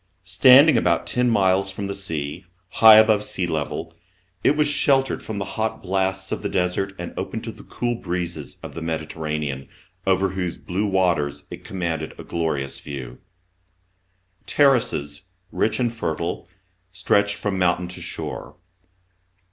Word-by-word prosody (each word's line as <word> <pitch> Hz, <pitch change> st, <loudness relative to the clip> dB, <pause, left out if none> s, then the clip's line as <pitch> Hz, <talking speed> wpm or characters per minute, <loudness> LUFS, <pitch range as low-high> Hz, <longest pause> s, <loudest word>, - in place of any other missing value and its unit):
Standing 130 Hz, -, +7 dB
about 85 Hz, -4 st, +1 dB
ten 125 Hz, 0 st, +1 dB
miles 95 Hz, -3 st, +2 dB
from 100 Hz, +1 st, -5 dB
the 100 Hz, -, -3 dB
sea, 80 Hz, -3 st, -5 dB, 0.2 s
high 110 Hz, +2 st, +8 dB
above 110 Hz, -1 st, +5 dB
sea 95 Hz, -3 st, -2 dB
level, 80 Hz, 0 st, -3 dB, 0.5 s
it 150 Hz, -, +3 dB
was 150 Hz, -1 st, +3 dB
sheltered 135 Hz, -2 st, +2 dB
from 110 Hz, -, -6 dB
the 100 Hz, -, -2 dB
hot 110 Hz, +2 st, -3 dB
blasts 95 Hz, 0 st, -1 dB
of -, -, -2 dB
the 100 Hz, -, -2 dB
desert 95 Hz, +1 st, -1 dB
and 90 Hz, -, -6 dB
open -, -, -4 dB
to -, -, -6 dB
the -, -, -14 dB
cool 120 Hz, 0 st, -3 dB
breezes 85 Hz, -7 st, -4 dB
of -, -, -8 dB
the 85 Hz, -, -6 dB
Medi 80 Hz, -1 st, -2 dB
terranean, 75 Hz, -4 st, -4 dB, 0.4 s
over 95 Hz, 0 st, +3 dB
whose 90 Hz, -2 st, -3 dB
blue 100 Hz, +4 st, -2 dB
waters 85 Hz, -7 st, 0 dB
it -, -, -8 dB
commanded 85 Hz, -4 st, -4 dB
a -, -, -7 dB
glorious 80 Hz, -5 st, -2 dB
view. 65 Hz, -4 st, -8 dB, 1.3 s
Terraces 120 Hz, -, +2 dB, 0.3 s
rich 110 Hz, 0 st, 0 dB
and 120 Hz, -2 st, 0 dB
fertile. 85 Hz, -6 st, -3 dB, 0.4 s
stretched 100 Hz, +2 st, +1 dB
from 100 Hz, -2 st, -2 dB
mountain 90 Hz, 0 st, +1 dB
to 90 Hz, -, -7 dB
shore. -, -, -6 dB
95 Hz, 150 wpm, -23 LUFS, 80-105 Hz, 1.3 s, high